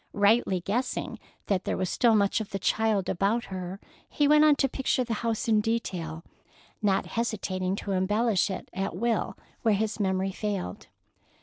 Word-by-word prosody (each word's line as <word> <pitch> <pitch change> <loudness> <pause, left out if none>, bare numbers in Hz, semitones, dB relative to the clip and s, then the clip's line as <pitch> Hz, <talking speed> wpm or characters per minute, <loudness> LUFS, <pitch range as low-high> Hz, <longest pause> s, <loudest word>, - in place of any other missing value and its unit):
Rightly 205 -2 +3
guessing 240 +8 -2 0.3
that 190 -2 0
there - - -2
was 185 - -1
still 230 +4 +3
much 200 +1 +2
of 215 - -6
the 195 - -3
child 215 0 +1
about 200 +6 +1
her, 185 +1 -5 0.3
he 290 - +2
went 300 +1 +6
on 305 -1 +6
to 270 - +2
picture 260 -1 0
the 235 -1 -3
house 230 -1 -1
in 215 -2 +4
detail, 175 -8 -3 0.6
not 200 -2 +2
hesitating 190 -5 -2
to 200 - -5
embellish 205 +2 +2
it 190 - -5
at 195 +1 -3
will 235 -2 -1 0.2
where 220 -3 +3
his 215 +1 -2
memory 190 -1 0
failed. 195 - -4
205 Hz, 170 wpm, -27 LUFS, 190-230 Hz, 0.6 s, went